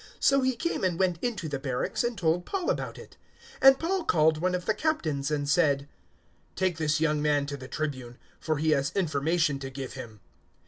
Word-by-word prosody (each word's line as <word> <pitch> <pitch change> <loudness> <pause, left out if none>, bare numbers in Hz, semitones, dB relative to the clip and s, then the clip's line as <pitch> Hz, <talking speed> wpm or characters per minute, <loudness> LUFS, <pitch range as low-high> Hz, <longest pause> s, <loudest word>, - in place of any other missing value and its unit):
So 275 0 +4
he 260 -1 +1
came 335 - -2
and 180 -3 +1
went 180 -3 +1
into 215 -9 -2
the 145 -3 -3
barracks 130 - -2
and 240 -2 -2
told 170 -1 +1
Paul 380 - -1
about - - -4
it; - - -13 0.4
023:017 - - +7
and 270 0 +8
Paul 365 +2 -1
called 160 - +3
one 180 +2 +1
of 180 - -4
the 215 - +2
Captains 160 - -1
and 145 -1 -1
said, 145 -2 +2 0.7
"Take 185 -3 0
this 155 0 +1
young 155 -2 +1
man 145 -1 +2
to 140 0 -5
the 130 -2 -9
Tribune, 130 -4 -4 0.2
for 155 -2 -1
he 155 +2 +1
has 140 -2 +1
information 155 -3 +1
to 135 -1 -6
give 135 -1 -7
him." 110 -2 -9
155 Hz, 210 wpm, -28 LUFS, 140-185 Hz, 0.7 s, and